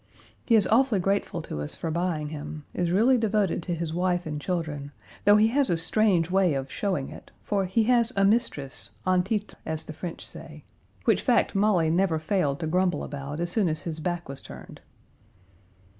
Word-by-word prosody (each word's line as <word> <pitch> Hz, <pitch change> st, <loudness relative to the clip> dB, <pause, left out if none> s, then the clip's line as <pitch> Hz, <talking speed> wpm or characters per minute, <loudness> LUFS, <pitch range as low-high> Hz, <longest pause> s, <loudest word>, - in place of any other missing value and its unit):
He 230 Hz, -, +3 dB
is 210 Hz, -4 st, +6 dB
awfully 230 Hz, -1 st, +3 dB
grateful 195 Hz, -3 st, -1 dB
to 75 Hz, -, -5 dB
us 75 Hz, -, -5 dB
for 165 Hz, -, -4 dB
buying 165 Hz, -3 st, -1 dB
him; 150 Hz, 0 st, -7 dB
is 175 Hz, -1 st, -1 dB
really 235 Hz, +8 st, +4 dB
devoted 210 Hz, -4 st, +1 dB
to 175 Hz, +1 st, -3 dB
his 165 Hz, -1 st, -4 dB
wife 180 Hz, 0 st, 0 dB
and 150 Hz, -1 st, -4 dB
children, 155 Hz, -6 st, -3 dB, 0.3 s
though 205 Hz, -, +7 dB
he 215 Hz, +1 st, +4 dB
has 275 Hz, +3 st, +2 dB
a 170 Hz, -, +2 dB
strange 180 Hz, 0 st, +2 dB
way 185 Hz, -5 st, +3 dB
of 135 Hz, 0 st, -4 dB
showing 185 Hz, -10 st, -2 dB
it, -, -, -12 dB
for 200 Hz, -2 st, 0 dB
he 205 Hz, +5 st, +1 dB
has 240 Hz, 0 st, +3 dB
a 195 Hz, 0 st, +3 dB
mistress, 195 Hz, -, 0 dB, 0.2 s
en 185 Hz, -1 st, +3 dB
titre, 205 Hz, +2 st, -2 dB
as 160 Hz, -1 st, -2 dB
the 155 Hz, -, -8 dB
French 170 Hz, +1 st, -6 dB
say, -, -, -9 dB, 0.4 s
which -, -, +3 dB
fact 245 Hz, -3 st, +2 dB
Molly 195 Hz, -6 st, +2 dB
never 175 Hz, -1 st, +2 dB
failed 155 Hz, -4 st, 0 dB
to -, -, -1 dB
grumble 180 Hz, +3 st, +1 dB
about 145 Hz, +1 st, -6 dB
as 175 Hz, 0 st, -1 dB
soon 200 Hz, -5 st, +2 dB
as 155 Hz, -, -1 dB
his 160 Hz, -2 st, -4 dB
back 175 Hz, +1 st, -3 dB
was 135 Hz, 0 st, -3 dB
turned. -, -, -11 dB
180 Hz, 195 wpm, -26 LUFS, 155-205 Hz, 0.4 s, though